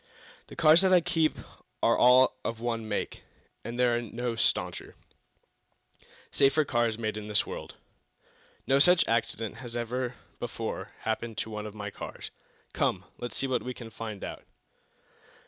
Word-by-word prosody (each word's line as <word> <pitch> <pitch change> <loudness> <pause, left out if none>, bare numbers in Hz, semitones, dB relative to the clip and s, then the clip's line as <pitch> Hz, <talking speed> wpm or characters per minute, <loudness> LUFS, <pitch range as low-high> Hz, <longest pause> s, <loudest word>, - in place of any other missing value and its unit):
"The - - -11
cars 155 +3 +6
that 190 -1 +3
I 180 - +8
keep 165 -2 +1 0.5
are - - +5
all 130 +1 +5
of 115 -1 -3
one 115 -2 -2
make, 105 - -3 0.4
and 120 +1 -5
there 125 -1 +4
are 120 - 0
no 120 +1 -3
stauncher, 115 - 0 1.4
safer 140 +3 +4
cars 120 -4 +1
made 110 -2 -2
in 105 0 -6
the 105 -1 +3
world. - - -7 0.9
No 135 +1 +4
such 180 +4 +5
accident 115 -1 -1
has 120 -2 -6
ever 125 +1 -2 0.2
before - - -4
happened 110 0 -3
to 110 - -3
one 105 0 -4
of 105 - -10
my 105 -1 -5
cars. - - -8 0.4
Come; - - 0
let's 120 - -4
see - - 0
what 130 -2 0
we 125 0 -5
can 115 -2 -9
find 110 -3 -6
out." - - -6
120 Hz, 160 wpm, -29 LUFS, 110-130 Hz, 1.4 s, I